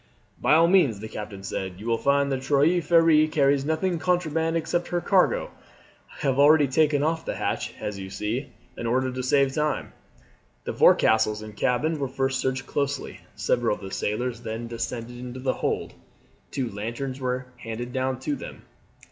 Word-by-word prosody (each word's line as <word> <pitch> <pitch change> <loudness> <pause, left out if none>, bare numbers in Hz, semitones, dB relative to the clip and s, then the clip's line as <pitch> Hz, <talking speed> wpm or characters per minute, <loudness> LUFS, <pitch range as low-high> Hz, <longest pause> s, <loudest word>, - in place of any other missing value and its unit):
"By 135 +5 +4
all 165 +1 +6
means," 165 - +4
the 110 - -6
captain 105 -2 -7
said, 95 -1 -4
"you 105 - -9
will 115 -1 +1
find 140 0 +2
the 135 - 0
Trois 145 +6 +3
Freres 165 -2 +4
carries 140 -2 +2
nothing 160 +3 0
contraband 165 -1 0
except 170 +2 -1
her 175 - -1
cargo. 185 +1 +2 0.7
I - - -10
have 135 0 +1
already 145 0 +6
taken 145 +1 +2
off 160 +1 0
the - - -4
hatch, - - -2
as 105 -2 -4
you 95 0 -7
see, 115 +8 -3 0.3
in 115 - -4
order 130 +2 +1
to 130 0 -4
save 135 +1 +2
time." 150 +1 -1 0.7
The - - -4
forecastles 110 -1 +4
and 105 -1 -10
cabin 145 +7 0
were 140 - -1
first 135 0 -1
searched 130 0 -1
closely. 140 -1 -3 0.2
Several 120 -3 +1
of - - -14
the 95 - -7
sailors 120 +3 -2
then 115 +1 -5
descended 115 +1 -5
into 125 +1 -7
the 130 0 0
hold. - - -2 0.6
Two 130 -3 -2
lanterns 120 +6 -4
were 130 0 -2
handed 120 +1 -6
down 130 -1 -1
to 145 +2 -1
them. - - -9
130 Hz, 180 wpm, -25 LUFS, 115-150 Hz, 0.7 s, all